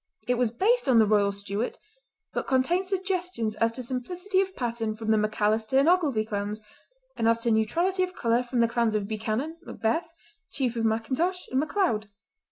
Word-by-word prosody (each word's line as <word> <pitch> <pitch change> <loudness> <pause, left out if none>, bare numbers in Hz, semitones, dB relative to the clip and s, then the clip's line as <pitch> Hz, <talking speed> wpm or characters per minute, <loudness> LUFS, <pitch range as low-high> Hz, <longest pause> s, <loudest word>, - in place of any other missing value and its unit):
It 250 - +3
was 245 -1 +1
based 400 - +1
on 245 - +5
the 220 - +6
Royal 205 -1 +3
Stuart, 200 +3 -3 0.6
but - - -3
contained 340 +9 +1
suggestions 365 - -1
as 230 0 +2
to 255 - -5
simplicity 360 - -1
of 380 -1 -4
pattern 230 -3 -2
from 220 0 -2
the 220 - +4
Macalister 215 +3 +1
and 275 +3 +4
Ogilvie 300 -11 +3
clans, 205 0 -3 0.6
and 225 - 0
as 230 0 +4
to 235 - +2
neutrality 340 - +1
of 365 0 -1
colour 235 +1 +2
from 245 -1 -1
the 230 - +4
clans 230 -1 +1
of 205 -2 -1
Buchanan, 220 +9 -3
Macbeth, 325 +5 -2 0.4
Chief 250 -3 -1
of 225 -1 0
Macintosh 260 +12 0
and 260 - +2
Macleod. 300 - 0
235 Hz, 180 wpm, -27 LUFS, 220-340 Hz, 0.6 s, the